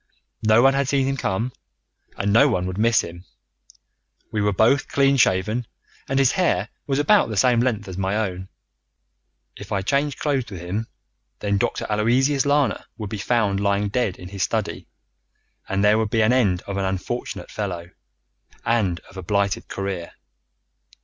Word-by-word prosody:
No 110 Hz, +2 st, +5 dB
one 135 Hz, 0 st, +6 dB
had 140 Hz, -1 st, 0 dB
seen 135 Hz, -1 st, +2 dB
him 135 Hz, +1 st, 0 dB
come 115 Hz, 0 st, -2 dB, 0.6 s
and 100 Hz, 0 st, 0 dB
no 140 Hz, +6 st, +6 dB
one 90 Hz, -9 st, 0 dB
would 95 Hz, +2 st, -4 dB
miss 115 Hz, +1 st, +4 dB
him. 85 Hz, +1 st, -9 dB, 1.1 s
We 105 Hz, -, -1 dB
were 105 Hz, 0 st, +2 dB
both 115 Hz, +8 st, +3 dB
clean 140 Hz, 0 st, +3 dB
shaven, 110 Hz, +1 st, +2 dB, 0.4 s
and 135 Hz, -, 0 dB
his 135 Hz, -1 st, +4 dB
hair 115 Hz, -, +1 dB, 0.2 s
was 135 Hz, -1 st, 0 dB
about 145 Hz, -, +4 dB
the 110 Hz, -, -4 dB
same 120 Hz, +3 st, +4 dB
length 115 Hz, -4 st, 0 dB
as 95 Hz, 0 st, -6 dB
my 95 Hz, +1 st, 0 dB
own. 95 Hz, -3 st, -3 dB, 1.1 s
If -, -, -11 dB
I 95 Hz, -1 st, 0 dB
changed 140 Hz, +4 st, 0 dB
clothes 135 Hz, -5 st, -1 dB
with 95 Hz, -4 st, -7 dB
him, 100 Hz, +6 st, -4 dB, 0.5 s
then 100 Hz, -1 st, 0 dB
Dr. -, -, -1 dB
Aloysius 130 Hz, +7 st, +2 dB
Lana 145 Hz, -1 st, +1 dB
would 105 Hz, -3 st, -6 dB
be 110 Hz, -, -4 dB
found 105 Hz, -3 st, +1 dB
lying 100 Hz, 0 st, +1 dB
dead 105 Hz, -4 st, -1 dB
in 90 Hz, -, -10 dB
his 100 Hz, 0 st, -6 dB
study, -, -, -2 dB, 0.8 s
and 95 Hz, +1 st, 0 dB
there 105 Hz, +1 st, +5 dB
would 110 Hz, -1 st, 0 dB
be 110 Hz, 0 st, +2 dB
an 110 Hz, +3 st, +3 dB
end 100 Hz, -8 st, +2 dB
of 100 Hz, -1 st, -5 dB
an 100 Hz, -, 0 dB
unfortunate 95 Hz, 0 st, -4 dB
fellow, 90 Hz, -5 st, -4 dB, 0.7 s
and 105 Hz, -7 st, +1 dB
of 95 Hz, -, -16 dB
a -, -, -4 dB
blighted 100 Hz, +1 st, 0 dB
career. 95 Hz, -3 st, -4 dB
105 Hz, 175 wpm, -23 LUFS, 95-125 Hz, 1.1 s, one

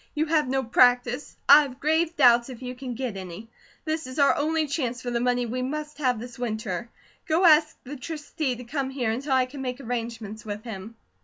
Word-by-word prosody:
You 305 Hz, +1 st, +1 dB
have 305 Hz, -3 st, +2 dB
no 265 Hz, +1 st, 0 dB
practice; 245 Hz, +2 st, +2 dB
I 300 Hz, -, +10 dB
have 270 Hz, -3 st, -6 dB
grave 320 Hz, +2 st, +1 dB
doubts 240 Hz, -3 st, +5 dB
if 255 Hz, -1 st, -9 dB
you 250 Hz, 0 st, -5 dB
can 250 Hz, -1 st, -6 dB
get 250 Hz, -4 st, -4 dB
any; 190 Hz, +4 st, -8 dB, 0.3 s
this 315 Hz, -2 st, -2 dB
is 255 Hz, -, -8 dB
our 280 Hz, -1 st, +4 dB
only 315 Hz, +2 st, +1 dB
chance 265 Hz, -5 st, -2 dB
for 250 Hz, -1 st, -5 dB
the 235 Hz, -, 0 dB
money 245 Hz, 0 st, +1 dB
we 250 Hz, +2 st, -3 dB
must 300 Hz, +3 st, -4 dB
have 250 Hz, -5 st, +1 dB
this 245 Hz, +2 st, -9 dB
winter. 220 Hz, -2 st, -3 dB, 0.4 s
Go 325 Hz, +4 st, +3 dB
ask 310 Hz, -1 st, +5 dB
the 285 Hz, +3 st, -8 dB
Trustee 295 Hz, -1 st, -3 dB
to 250 Hz, -, -9 dB
come 270 Hz, +2 st, -3 dB
here 255 Hz, -4 st, -1 dB
until 265 Hz, +5 st, -2 dB
I 260 Hz, -1 st, +4 dB
can 270 Hz, +2 st, -9 dB
make 250 Hz, 0 st, -4 dB
arrangements 230 Hz, -4 st, -5 dB
with 210 Hz, 0 st, -6 dB
him." 220 Hz, -1 st, -8 dB
255 Hz, 215 wpm, -26 LUFS, 235-290 Hz, 0.4 s, I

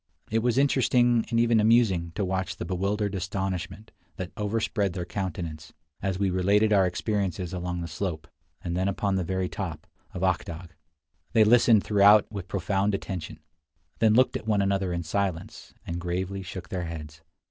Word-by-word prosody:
It 110 Hz, -, +2 dB
was 120 Hz, +1 st, +1 dB
interesting 125 Hz, -4 st, +3 dB
and 115 Hz, -, +1 dB
even 115 Hz, -1 st, +4 dB
amusing 105 Hz, -6 st, +3 dB
to 105 Hz, -, -1 dB
watch 95 Hz, 0 st, -2 dB
the -, -, -6 dB
bewildered 100 Hz, +3 st, -1 dB
astonishment 95 Hz, +2 st, -4 dB, 0.2 s
that 90 Hz, -1 st, -6 dB
overspread 105 Hz, -2 st, -1 dB
their 90 Hz, -1 st, -4 dB
countenances 85 Hz, -5 st, -5 dB, 0.3 s
as 95 Hz, -1 st, -1 dB
we 100 Hz, -1 st, +1 dB
related 100 Hz, +4 st, +3 dB
our 95 Hz, -2 st, +4 dB
experiences 95 Hz, -2 st, -2 dB
along 90 Hz, -1 st, -3 dB
the 85 Hz, -, -4 dB
slope, 80 Hz, 0 st, -4 dB, 0.4 s
and 85 Hz, -1 st, -3 dB
then 95 Hz, +2 st, 0 dB
upon 100 Hz, 0 st, 0 dB
the 95 Hz, -1 st, 0 dB
very 95 Hz, +1 st, -1 dB
top, 90 Hz, -5 st, -5 dB, 0.3 s
of 90 Hz, -, -3 dB
Ak 95 Hz, -2 st, +2 dB
Dagh. 85 Hz, 0 st, -8 dB, 0.6 s
They 110 Hz, -, +6 dB
listened 115 Hz, -1 st, +5 dB
throughout 105 Hz, 0 st, +6 dB
with 100 Hz, -4 st, -6 dB
profound 100 Hz, +2 st, 0 dB
attention, 95 Hz, -4 st, -6 dB, 0.6 s
then 110 Hz, -1 st, +4 dB
looked 130 Hz, +1 st, +4 dB
at -, -, -5 dB
one 105 Hz, -2 st, +2 dB
another 95 Hz, -1 st, 0 dB
in 85 Hz, 0 st, -2 dB
silence, 90 Hz, 0 st, -3 dB
and 85 Hz, +1 st, -4 dB
gravely 95 Hz, +2 st, -3 dB
shook 95 Hz, 0 st, -8 dB
their 90 Hz, -2 st, -3 dB
heads. 75 Hz, -2 st, -8 dB
95 Hz, 170 wpm, -27 LUFS, 90-105 Hz, 0.6 s, They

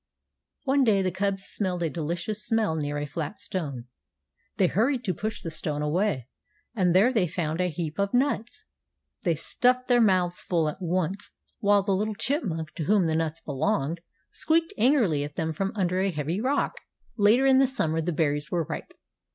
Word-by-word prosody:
One 275 Hz, +1 st, +3 dB
day 205 Hz, -5 st, +3 dB
the 185 Hz, -, 0 dB
cubs 195 Hz, +1 st, -1 dB
smelled 185 Hz, -4 st, -1 dB
a 165 Hz, -, +1 dB
delicious 170 Hz, +7 st, -3 dB
smell 220 Hz, -7 st, +1 dB
near 145 Hz, -1 st, -2 dB
a 145 Hz, -, -2 dB
flat 150 Hz, +6 st, -5 dB
stone. 155 Hz, -12 st, -4 dB, 0.7 s
They 190 Hz, -, +4 dB
hurried 240 Hz, +8 st, +1 dB
to 185 Hz, -, 0 dB
push 215 Hz, +6 st, -4 dB
the 165 Hz, -, -4 dB
stone 150 Hz, -1 st, -3 dB
away, 150 Hz, -, 0 dB, 0.5 s
and 180 Hz, -4 st, +2 dB
there 220 Hz, +8 st, +5 dB
they 205 Hz, -7 st, +2 dB
found 165 Hz, 0 st, -2 dB
a 180 Hz, -, +1 dB
heap 160 Hz, +1 st, -5 dB
of 200 Hz, 0 st, +1 dB
nuts. 245 Hz, -3 st, 0 dB, 0.6 s
They 170 Hz, -2 st, +1 dB
stuffed 250 Hz, +9 st, +2 dB
their 245 Hz, -1 st, +4 dB
mouths 185 Hz, -4 st, +2 dB
full 165 Hz, -3 st, 0 dB
at 150 Hz, +5 st, -5 dB
once, 185 Hz, +2 st, -1 dB, 0.3 s
while 205 Hz, -1 st, +4 dB
the 195 Hz, -1 st, +1 dB
little 210 Hz, +2 st, -1 dB
chipmunk, 195 Hz, -, -2 dB
to 160 Hz, -, -2 dB
whom 200 Hz, -1 st, +3 dB
the 160 Hz, -1 st, +1 dB
nuts 160 Hz, 0 st, -2 dB
belonged, 160 Hz, +2 st, -1 dB, 0.3 s
squeaked 330 Hz, +1 st, +1 dB
angrily 220 Hz, -, +3 dB
at 145 Hz, 0 st, -7 dB
them 160 Hz, -1 st, -2 dB
from 195 Hz, +5 st, -2 dB
under 185 Hz, -2 st, 0 dB
a 195 Hz, -, +1 dB
heavy 165 Hz, +3 st, -2 dB
rock. 275 Hz, +4 st, 0 dB, 0.4 s
Later 220 Hz, +5 st, +4 dB
in 265 Hz, -1 st, +6 dB
the 270 Hz, -, +5 dB
summer 165 Hz, -, 0 dB
the 175 Hz, +2 st, -1 dB
berries 145 Hz, -2 st, 0 dB
were 175 Hz, -2 st, 0 dB
ripe. -, -, -7 dB
185 Hz, 185 wpm, -26 LUFS, 160-215 Hz, 0.7 s, in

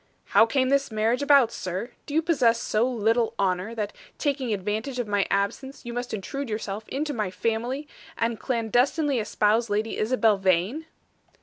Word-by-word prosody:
"How 225 Hz, -, +6 dB
came 260 Hz, +2 st, +1 dB
this 275 Hz, 0 st, +2 dB
marriage 225 Hz, +4 st, +1 dB
about, 280 Hz, -5 st, +5 dB
sir? 185 Hz, +6 st, -4 dB, 0.2 s
Do 290 Hz, -, -4 dB
you 320 Hz, -, +3 dB
possess 250 Hz, -8 st, +3 dB
so 225 Hz, +4 st, +1 dB
little 230 Hz, -1 st, +1 dB
honor, 190 Hz, +3 st, 0 dB
that, 210 Hz, -2 st, -3 dB, 0.2 s
taking 275 Hz, -5 st, -1 dB
advantage 215 Hz, +6 st, -2 dB
of 245 Hz, -3 st, -2 dB
my 205 Hz, -1 st, +1 dB
absence, 250 Hz, +8 st, -2 dB
you 235 Hz, -, -5 dB
must 245 Hz, 0 st, -4 dB
intrude 245 Hz, +6 st, -4 dB
yourself 215 Hz, 0 st, -4 dB
into 295 Hz, +2 st, -2 dB
my 215 Hz, -6 st, -1 dB
family, 235 Hz, +8 st, -2 dB, 0.3 s
and 230 Hz, -1 st, -1 dB
clandestinely 255 Hz, +4 st, +1 dB
espouse 215 Hz, +1 st, +1 dB
Lady 215 Hz, +2 st, -1 dB
Isabel 220 Hz, -2 st, +2 dB
Vane?" 190 Hz, -, +1 dB
230 Hz, 165 wpm, -26 LUFS, 210-265 Hz, 0.3 s, How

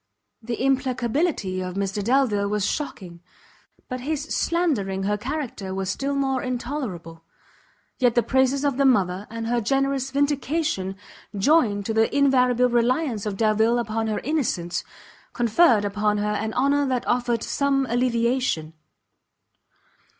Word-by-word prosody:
The 235 Hz, 0 st, -4 dB
implacability 255 Hz, -, 0 dB
of 185 Hz, 0 st, -5 dB
Mr 200 Hz, +1 st, -2 dB
Delvile 230 Hz, -4 st, +2 dB
was 210 Hz, -1 st, 0 dB
shocking, 185 Hz, -, -4 dB, 0.7 s
but 255 Hz, -1 st, -4 dB
his 295 Hz, +2 st, -2 dB
slandering 270 Hz, -, -1 dB
her 205 Hz, +2 st, +1 dB
character 230 Hz, -5 st, -4 dB
was 190 Hz, 0 st, -2 dB
still 275 Hz, +5 st, -2 dB
more 270 Hz, -2 st, 0 dB
intolerable; 240 Hz, -, -5 dB, 0.8 s
yet 245 Hz, -3 st, +3 dB
the 240 Hz, -, +3 dB
praises 265 Hz, +2 st, +1 dB
of 280 Hz, -3 st, 0 dB
the 275 Hz, -, +3 dB
mother, 195 Hz, -6 st, +2 dB
and 230 Hz, 0 st, -5 dB
her 240 Hz, +1 st, 0 dB
generous 270 Hz, +2 st, 0 dB
vindication, 280 Hz, -, -1 dB, 0.4 s
joined 205 Hz, -4 st, +3 dB
to 225 Hz, -, -1 dB
the 225 Hz, 0 st, +2 dB
invariable 250 Hz, -3 st, +4 dB
reliance 240 Hz, -1 st, 0 dB
of 200 Hz, -2 st, -3 dB
Delvile 220 Hz, +2 st, +2 dB
upon 225 Hz, -1 st, -2 dB
her 215 Hz, -, -1 dB
innocence, 225 Hz, -, -1 dB, 0.5 s
conferred 235 Hz, -2 st, +3 dB
upon 210 Hz, +1 st, 0 dB
her 210 Hz, 0 st, -1 dB
an 220 Hz, +1 st, -2 dB
honour 280 Hz, +2 st, +2 dB
that 255 Hz, -2 st, -1 dB
offered 240 Hz, -2 st, 0 dB
some 275 Hz, -1 st, +1 dB
alleviation. 235 Hz, -, 0 dB
240 Hz, 135 wpm, -24 LUFS, 205-275 Hz, 0.8 s, invariable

